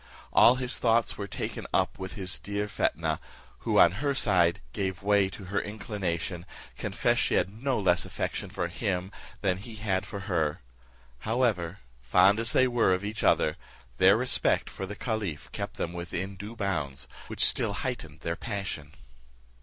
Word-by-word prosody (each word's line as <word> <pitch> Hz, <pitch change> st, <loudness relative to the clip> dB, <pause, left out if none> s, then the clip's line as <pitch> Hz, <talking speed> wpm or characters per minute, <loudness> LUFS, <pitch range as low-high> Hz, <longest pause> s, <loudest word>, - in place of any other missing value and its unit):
All 120 Hz, -, +7 dB
his 125 Hz, -1 st, 0 dB
thoughts 115 Hz, -1 st, +3 dB
were 100 Hz, -, -5 dB
taken -, -, -5 dB
up -, -, +1 dB
with 95 Hz, 0 st, -5 dB
his 95 Hz, -3 st, -3 dB
dear 105 Hz, 0 st, -2 dB
Fetnah, 80 Hz, -6 st, 0 dB, 0.4 s
who, -, -, 0 dB
on 85 Hz, -, +8 dB
her 140 Hz, -2 st, +1 dB
side, 90 Hz, -8 st, +3 dB
gave 95 Hz, -1 st, -2 dB
way 100 Hz, -1 st, +4 dB
to 95 Hz, -, -9 dB
her 95 Hz, +2 st, -1 dB
inclination, 95 Hz, -4 st, -3 dB, 0.3 s
confessed -, -, +1 dB
she -, -, +2 dB
had 95 Hz, -, +1 dB
no 135 Hz, -3 st, +1 dB
less 90 Hz, -3 st, +3 dB
affection -, -, -3 dB
for 85 Hz, -, -2 dB
him 95 Hz, 0 st, -2 dB, 0.3 s
than 95 Hz, -3 st, +1 dB
he 110 Hz, +3 st, -9 dB
had 100 Hz, -3 st, 0 dB
for 100 Hz, -, -6 dB
her. 80 Hz, -, 0 dB, 0.6 s
However, 105 Hz, -, 0 dB, 0.2 s
fond 90 Hz, -, +5 dB
as 115 Hz, 0 st, 0 dB
they 130 Hz, -, +4 dB
were 120 Hz, -6 st, +3 dB
of 95 Hz, +2 st, -5 dB
each 105 Hz, +1 st, -4 dB
other, -, -, +3 dB, 0.4 s
their 95 Hz, +3 st, +6 dB
respect 125 Hz, +2 st, +1 dB
for 95 Hz, -, -5 dB
the 105 Hz, -, -6 dB
caliph 105 Hz, -, -3 dB
kept -, -, -5 dB
them 85 Hz, -, -3 dB
within 90 Hz, +3 st, -4 dB
due 105 Hz, +5 st, -8 dB
bounds, 75 Hz, -10 st, -2 dB, 0.2 s
which -, -, +2 dB
still -, -, +1 dB
heightened -, -, -4 dB
their 85 Hz, -, -2 dB
passion. 100 Hz, -10 st, -5 dB
100 Hz, 170 wpm, -28 LUFS, 90-110 Hz, 0.6 s, on